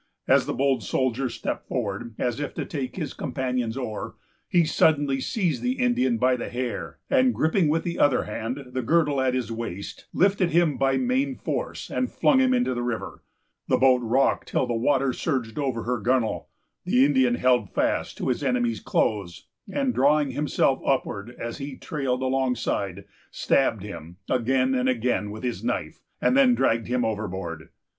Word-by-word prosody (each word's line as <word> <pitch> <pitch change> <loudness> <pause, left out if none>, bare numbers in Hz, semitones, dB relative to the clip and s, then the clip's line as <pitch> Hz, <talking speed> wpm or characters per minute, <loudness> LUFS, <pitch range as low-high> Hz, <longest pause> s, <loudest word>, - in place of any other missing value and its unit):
As - - +4
the - - -1
bold 135 -1 +1
soldier 130 0 0
stepped - - -4
forward, 110 -1 -3
as 120 0 -1
if 145 - -4
to - - -3
take 135 -4 -4
his 155 -7 -4
companion's 125 -3 -2
oar, 115 -5 -5 0.3
he 175 -2 +4
suddenly 145 -4 +2
seized 180 - -1
the 250 0 +1
Indian 240 - +1
by 125 +2 +3
the 125 - -5
hair, 125 -1 -4
and, 260 -2 +3
griping 160 +2 +2
with 160 +2 +1
the 170 - -3
other 145 -3 +4
hand 125 +5 -5
the 130 - -2
girdle 145 +1 +2
at 130 -1 +1
his 120 -3 -2
waist, 110 -4 -6
lifted 190 -1 +2
him 170 -3 +3
by 135 0 +2
main 260 +2 0
force, - - -4
and 255 - -1
flung 265 - +3
him 260 -1 +3
into 245 - +2
the 120 - -3
river. 120 -2 -4 0.5
The - - +3
boat 130 -1 +4
rocked 120 +4 +1
till - - 0
the 120 - -2
water 130 +3 +1
surged 130 -6 -2
over 130 -6 -1
her 125 0 -1
gunwale. 120 0 0 0.4
The 130 +2 +4
Indian 130 -4 +3
held 125 -5 +2
fast - - -1
to - - -2
his 125 +3 -1
enemy's 120 -4 0
clothes, 100 -6 -1 0.3
and, 275 -3 0
drawing 145 +1 +3
himself 140 -1 +1
upward 120 -5 -1
as 115 +4 -5
he 140 -1 -6
trailed 130 -4 -2
alongside, 125 -7 -1 0.2
stabbed 115 -7 +1
him 90 -4 -9
again 130 +1 +1
and 130 0 +1
again 120 -4 0
with 110 +3 -8
his 125 -2 -3
knife, - - -3 0.2
and - - +2
then 265 -3 +5
dragged 115 - +1
him 125 -1 0
overboard. 95 -7 -4
130 Hz, 175 wpm, -25 LUFS, 115-145 Hz, 0.5 s, then